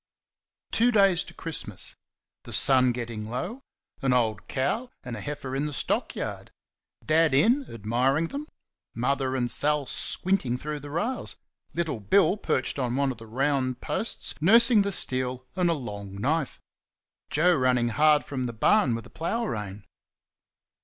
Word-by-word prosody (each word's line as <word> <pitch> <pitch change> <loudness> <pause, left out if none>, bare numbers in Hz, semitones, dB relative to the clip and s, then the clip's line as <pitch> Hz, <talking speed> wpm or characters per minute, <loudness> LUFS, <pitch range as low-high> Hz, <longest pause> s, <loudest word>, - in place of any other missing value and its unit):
Two 240 +2 +4
days 195 -5 +4
to - - -11
Christmas. 150 - -3 0.5
The - - -8
sun 130 -2 +5
getting 115 -3 -5
low. 180 - -4 0.4
An 135 -2 +2
old 110 -4 0
cow 210 - -1
and 125 -2 -5
a - - -6
heifer 140 -2 -5
in 145 +2 -1
the - - -5
stock - - -1
yard. - - -5 0.6
Dad 155 -2 +3
in, 240 - +3
admiring 125 +9 0
them; 290 +2 -5 0.5
Mother 130 +2 0
and 120 -2 0
Sal 150 -1 +2
squinting 155 -5 0
through 150 +3 -5
the 145 0 -9
rails; 210 - -2 0.4
little 160 -8 -1
Bill 160 - +3
perched 130 -10 -1
on 125 -2 -1
one 140 0 +1
of 120 - -9
the 115 - -11
round 130 +1 0
posts, 225 - -3
nursing 230 +5 +6
the 200 0 0
steel 130 -6 -2
and 180 -2 +2
a - - +3
long 105 -8 -6
knife; 140 +8 -1 0.7
Joe 175 +4 +4
running 125 -3 +2
hard 150 +4 +4
from 130 -3 -4
the 120 - -4
barn 125 - +3
with 115 - -6
a - - -15
plough 225 +9 -2
rein. 105 - -5
140 Hz, 160 wpm, -27 LUFS, 125-170 Hz, 0.7 s, nursing